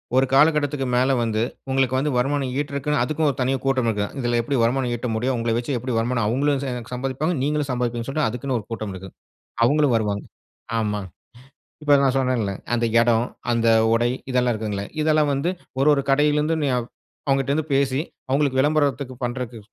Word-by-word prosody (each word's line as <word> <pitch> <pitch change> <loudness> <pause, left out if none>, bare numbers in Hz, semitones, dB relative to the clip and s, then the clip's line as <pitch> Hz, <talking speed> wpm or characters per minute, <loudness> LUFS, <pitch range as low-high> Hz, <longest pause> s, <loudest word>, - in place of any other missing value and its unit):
ஒரு 130 +1 +5
காலகட்டத்துக்கு 145 -1 +3
மேல 130 +2 +3
வந்து, 110 -1 0 0.3
உங்களுக்கு 130 -1 +1
வந்து 150 +2 0
வருமானம் 135 +1 0
ஈட்டுறக்குன்னு 145 0 -1
அதுக்கும் 155 0 0
ஒரு 135 - -2
தனியா 130 +1 +1
கூட்டமிருக்கும். 115 -6 0
இதில 120 -2 0
எப்டி 135 +4 -1
வருமானம் 125 +1 +1
ஈட்ட 120 +1 -4
முடியும்? 125 +4 0
உங்கள 115 0 0
வச்சி 120 +4 -3
எப்படி 125 +1 -3
வருமானம் 115 -1 0
அவுங்களும் 140 +4 +1
ச - - -3 0.3
சம்பாதிப்பாங்க, 135 +6 -1
நீங்களும் 150 0 0
சம்பாதிப்பீங்கன்னு 120 -1 -2
சொல்ட்டு 150 0 0
அதுக்குன்னு 125 +2 -2
ஒரு 105 - -11
கூட்டம் 110 -3 -4
இருக்கு. 95 +1 -9 0.6
அவுங்களும் 145 0 +3
வருவாங்க. 105 -2 -2 0.6
ஆமா. 105 -1 -1 0.8
இப்போ 145 -1 +4
நான் 135 -1 +2
சொன்னேன்ல்ல. 125 -6 0 0.2
அந்த 120 0 0 0.2
எடம், 115 -1 +3 0.3
அந்த 115 -1 +1 0.3
உடை 120 +1 +2 0.2
இதெல்லாம் 125 -1 +2
இருக்குதுங்கல, 105 -3 -3 0.2
இதெல்லாம் 155 -1 +3
வந்து 140 +6 0 0.3
ஒரு 140 - +4
ஒரு 140 - 0
கடையிலருந்து 150 +3 +2
நீ - - +1
அவு 120 -1 -2 0.4
அவுங்கட்டருந்து 140 +3 +1
பேசி, 135 0 +2 0.3
அவுங்களுக்கு 135 0 +1
விளம்பரத்துக்கு 145 -2 +1
பண்றக்கு, 120 -1 -4
130 Hz, 165 wpm, -23 LUFS, 120-145 Hz, 0.8 s, ஒரு